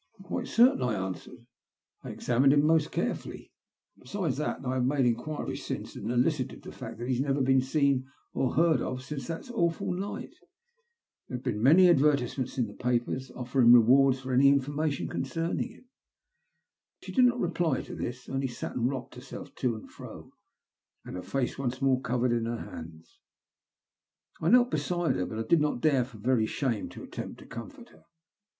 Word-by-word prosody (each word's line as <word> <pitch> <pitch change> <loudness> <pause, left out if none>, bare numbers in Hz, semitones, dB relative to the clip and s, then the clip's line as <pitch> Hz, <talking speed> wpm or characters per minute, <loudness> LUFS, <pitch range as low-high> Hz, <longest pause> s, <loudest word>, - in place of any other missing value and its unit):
" 195 - -15
"Quite 190 - -4
certain," 240 - +4
I 125 -4 0
answered. 95 +4 -6 0.6
"I - - -7
examined 130 +3 +2
him 145 0 +4
most 160 -1 +3
carefully. - - -4 0.5
Besides, 150 0 -3
I 135 -3 -2
have 130 -1 0
made 135 +1 +2
enquiries 125 +6 -2
since - - -5
and 105 - -5
elicited 130 +2 0
the - - -8
fact - - -8
that 120 +1 -5
he 130 - +1
has - - 0
never 140 0 0
been 130 0 +4
seen 135 -1 +1 0.2
or 130 - 0
heard 165 0 +3
of 130 0 -4
since 140 0 -6
that 170 +9 -6
awful 170 -6 0
night. 195 +3 -5 0.9
There 125 - -4
have 125 - -12
been 115 -1 0
advertisements 140 -7 +4
in 125 - +2
the 100 - -9
papers 125 +1 -1
offering 125 -1 +4
rewards 130 +3 +6
for 130 0 -4
any 135 +2 +6
information 140 +2 +1
concerning 165 - -2
him." 245 +2 -17 1.2
She - - -7
did 255 -2 +5
not 245 0 +2
reply 170 - 0
to - - -9
this, 125 +1 -5
only 135 0 -1
sat 120 - -6
and 120 0 +1
rocked 130 -3 -5
herself 125 +2 -10
to 125 -3 0
and 110 - -10
fro, - - -11 0.7
her 90 - -6
face 135 +5 -2
once 130 -1 -2
more 135 -2 +2
covered 125 0 0
in 115 -1 0
her 120 +1 -2
hands. 80 0 -10 1.2
I 160 - +2
knelt 245 +1 +5
beside 175 -2 0
her, 90 - -1
but 110 0 -4
did 170 -3 +4
not 150 -4 0
dare, 135 -2 +3
for 125 -3 -14
very 115 0 +1
shame, 120 -6 -2
to - - -10
attempt - - -7
to - - -13
comfort 120 - -9
her. - - -22
130 Hz, 180 wpm, -29 LUFS, 120-150 Hz, 1.2 s, rewards